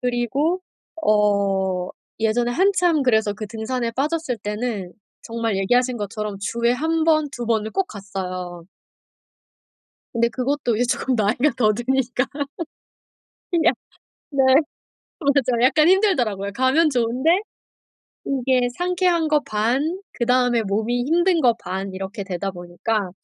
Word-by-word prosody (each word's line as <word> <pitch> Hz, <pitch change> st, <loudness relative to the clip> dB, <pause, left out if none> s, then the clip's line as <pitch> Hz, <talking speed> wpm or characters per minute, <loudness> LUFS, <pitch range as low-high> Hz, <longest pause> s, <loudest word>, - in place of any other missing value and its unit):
그리고 255 Hz, +8 st, 0 dB, 0.4 s
어 200 Hz, -3 st, +1 dB, 0.3 s
예전에 230 Hz, +2 st, +1 dB
한참 355 Hz, 0 st, +2 dB
그래서 220 Hz, -5 st, +2 dB
그 210 Hz, +1 st, -6 dB
등산에 230 Hz, +3 st, -3 dB
빠졌을 290 Hz, 0 st, -1 dB
때는 210 Hz, -3 st, -4 dB, 0.3 s
정말 230 Hz, -2 st, -2 dB
얘기하신 245 Hz, +6 st, +2 dB
것처럼 210 Hz, -1 st, -4 dB
주에 235 Hz, +3 st, 0 dB
1 320 Hz, +5 st, 0 dB
번, 310 Hz, -2 st, +3 dB
2 245 Hz, -3 st, -5 dB
번을 220 Hz, -1 st, 0 dB
꼭 385 Hz, -, 0 dB
갔어요. 185 Hz, -, -6 dB, 1.5 s
근데 235 Hz, 0 st, +2 dB
그것도 255 Hz, -1 st, -1 dB
이제 240 Hz, +3 st, +1 dB
조금 260 Hz, -, -1 dB
나이가 225 Hz, +6 st, +2 dB
더 215 Hz, -3 st, +4 dB
드니까. 250 Hz, +2 st, 0 dB, 1.3 s
그냥 340 Hz, -2 st, +3 dB, 0.6 s
네. 275 Hz, -2 st, +1 dB, 0.8 s
어 295 Hz, -, -7 dB
맞아 255 Hz, -4 st, +1 dB
약간 305 Hz, +5 st, +4 dB
힘들더라고요. 250 Hz, -, +2 dB
가면 265 Hz, +6 st, +3 dB
좋은데 255 Hz, +8 st, +2 dB, 0.9 s
이게 255 Hz, -2 st, +1 dB
상쾌한 355 Hz, -2 st, +1 dB
거 300 Hz, -1 st, +3 dB
반 260 Hz, -, -1 dB
그다음에 245 Hz, -1 st, +2 dB
몸이 220 Hz, +4 st, -1 dB
힘든 345 Hz, +4 st, +2 dB
거 245 Hz, -5 st, +4 dB
반 190 Hz, +2 st, -4 dB
이렇게 195 Hz, +3 st, -5 dB
되다 190 Hz, +1 st, -3 dB
보니까 180 Hz, +3 st, -3 dB
240 Hz, 255 characters per minute, -22 LUFS, 210-285 Hz, 1.5 s, 더